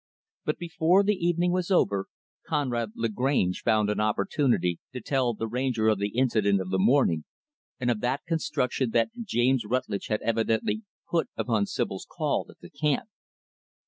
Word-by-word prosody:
But 150 - 0
before 175 +3 +2
the 210 +1 +3
evening 175 -1 +1
was 180 0 -1
over, 100 - +2 0.4
Conrad 120 -6 -1
Lagrange 115 -4 0
found 110 -2 +2
an 105 - -2
opportunity 110 - +1
to 130 - -4
tell 125 -1 0
the 115 - -3
Ranger 120 -2 +1
of 105 -2 +2
the 100 +3 -2
incident 110 -6 +3
of 95 0 -4
the 95 - +1
morning, 95 - +3 0.6
and 125 -1 +1
of 110 - -2
the 125 +3 +1
construction 135 -6 0
that 115 - +2
James 130 - +2
Rutlidge 105 -3 -2
had 105 - -1
evidently 115 - 0 0.3
put 170 -1 +1
upon 110 -4 +1
Sibyl's - - -3
call - - -1
at - - -15
the - - -12
camp. 185 +10 0
120 Hz, 160 wpm, -27 LUFS, 110-150 Hz, 0.6 s, the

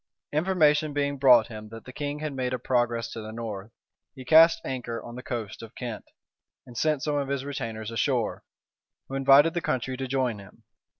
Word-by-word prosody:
Information 155 -3 +2
being 140 -1 -1
brought 125 -4 +7
him 110 -2 -9
that 115 0 -11
the 130 - -10
king 145 +1 -4
had 155 -2 -3
made 130 -1 -2
a - - -3
progress 120 -1 0
to 115 - -6
the 110 0 -7
north, 110 -3 -6 0.5
he 130 -2 -10
cast 165 +6 +7
anchor 120 -3 -4
on 120 - -9
the 125 - -7
coast 115 -5 -5
of 115 0 -11
Kent, 120 -4 -6 0.6
and 120 - -13
sent 150 +1 0
some 150 -1 0
of 140 -1 -1
his 140 -1 -2
retainers 115 -6 -5
ashore, 115 0 -1 0.7
who - - -8
invited 135 +4 +5
the 175 - -1
country 130 -2 -2
to 130 +1 -4
join 125 -4 -1
him. 100 +3 -15
130 Hz, 195 wpm, -27 LUFS, 115-145 Hz, 0.7 s, brought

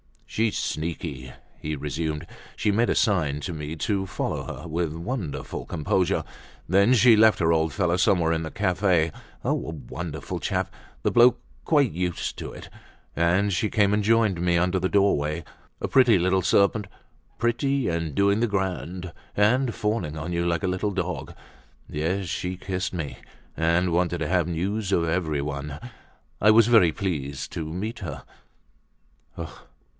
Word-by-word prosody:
"She's 110 -1 0
sneaky," 75 -5 -4 0.3
he 75 0 -3
resumed. 75 +2 -3 0.3
"She 105 - +1
made 115 +4 +2
a - - +2
sign 80 - +2
to 85 - -4
me 75 0 -5
to 95 +4 -1
follow 95 - -3 0.2
her, 85 - -8
with 80 -1 -1
wonderful 85 - -4
composure. 85 +4 0 0.4
Then 100 +7 +4
she 120 -1 +7
left 110 0 +6
her 85 -1 +3
old 80 -1 +2
fellow 90 -3 +1
somewhere 90 -3 +3
in 80 0 -1
a - - -4
cafe—oh 90 -2 +1 0.4
a - - +4
wonderful 80 +1 -5
chap, - - -2 0.3
the - - +3
old - - -6
bloke, 120 +1 +6 0.2
quite 145 -6 +3
used 90 +1 -3
up!—and 90 +4 -2
she 105 +4 0
came 105 -1 +3
and 105 0 +1
joined 110 -5 +3
me 85 -1 +2
under 90 +2 +1
the 95 +1 0
doorway. 85 -6 +2 0.4
A - - -1
pretty 125 -6 +5
little 95 +2 +2
serpent, 100 +3 +2 0.5
pretty, 130 +3 +1
and 85 -3 -2
doing 100 +4 +3
the 120 - +2
grand, 95 -3 -3 0.3
and 120 +4 +3
fawning 105 -8 -2
on 80 +3 -4
you 85 0 0
like 85 -2 0
a - - +1
little 95 +3 -1
dog. 90 -2 -4 0.5
Yes, 85 +6 -1
she 90 +2 -3
kissed 95 +1 -3
me, 80 -6 -4 0.4
and 85 +2 +2
wanted 85 0 +1
to 80 - -1
have 90 -1 +1
news 95 +4 -2
of 85 - +3
everyone—I 75 - -3
was 110 0 +6
very 110 -9 +5
pleased 70 -9 -3
to 80 - -4
meet 105 +7 -4
her." 75 -8 -6
90 Hz, 155 wpm, -25 LUFS, 80-105 Hz, 0.5 s, she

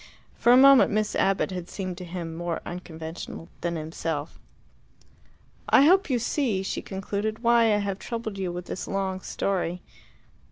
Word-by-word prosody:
For 240 - +3
a 250 - +8
moment 275 0 +8
Miss 215 -1 0
Abbott 195 0 +1
had 180 -1 -5
seemed 185 -2 -4
to 180 - -7
him 170 -2 -5
more 170 0 -3
unconventional 165 -1 -7
than 170 0 -1
himself. 160 -1 -4 1.3
"I - - +7
hope 370 +4 +5
you 255 - +2
see," 230 -5 0
she - - -3
concluded, 205 +3 -4
"why 235 0 +5
I 215 -2 +3
have 200 -1 -2
troubled 225 -4 -5
you 185 -2 -2
with 175 0 -6
this - - -5
long 190 -1 -2
story. 180 -3 -2
195 Hz, 160 wpm, -26 LUFS, 175-220 Hz, 1.3 s, a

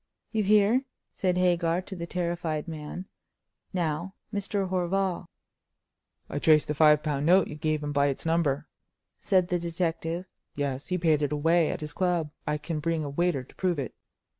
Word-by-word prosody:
"You 220 - +1
hear," 210 +5 +4 0.3
said 180 -1 0
Hagar 175 -2 +2
to 190 - -8
the 170 -1 -5
terrified 170 -3 -2
man. 160 +3 -6 0.7
"Now, 175 +1 -2 0.2
Mr. 200 -1 -1
Horval." 185 0 0 1.0
"I 145 - -3
traced 155 -1 +4
the - - +1
five 150 0 +5
pound 150 -1 -1
note 185 +1 +5
you - - -7
gave 155 0 -1
him 145 - -2
by 140 0 +3
its 140 +2 -2
number," 160 -4 +1 0.5
said 185 -3 +2
the 180 - +1
detective. 170 0 -2 0.3
"Yes, 140 -1 -2
he 180 - 0
paid 160 -4 +2
it 145 - 0
away 160 +2 +3
at - - -3
his 150 -1 -4
club; 175 -4 0 0.2
I 150 0 +1
can 155 +1 -4
bring 165 0 0
a 145 - -4
waiter 170 -3 +1
to - - -18
prove 180 -3 0
it." 135 -4 -4
165 Hz, 175 wpm, -28 LUFS, 150-180 Hz, 1.0 s, five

